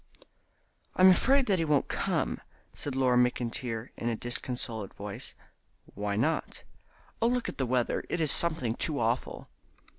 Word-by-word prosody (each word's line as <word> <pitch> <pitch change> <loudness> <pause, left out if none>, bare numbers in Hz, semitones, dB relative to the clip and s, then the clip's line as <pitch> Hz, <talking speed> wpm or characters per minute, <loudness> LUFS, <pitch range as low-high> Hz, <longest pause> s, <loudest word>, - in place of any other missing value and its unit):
"I'm 185 +1 +7
afraid 265 +8 +3
that 195 -5 +1
he 165 - +1
won't 150 -3 +2
come," - - -1 0.3
said 145 -3 -5
Laura 130 -2 +3
McIntyre, 120 -1 -1
in 120 - -2
a 115 - -1
disconsolate 120 -3 -3
voice. 100 0 -5 0.6
"Why 100 0 -2
not?" 155 +10 -1 0.6
"Oh, 230 - +4
look 245 0 0
at - - -6
the 130 - 0
weather; 125 -1 0
it 175 - -1
is 155 -3 +4
something 155 -9 +3
too 150 +4 -2
awful." 115 +2 -2
125 Hz, 150 wpm, -29 LUFS, 115-160 Hz, 0.6 s, I'm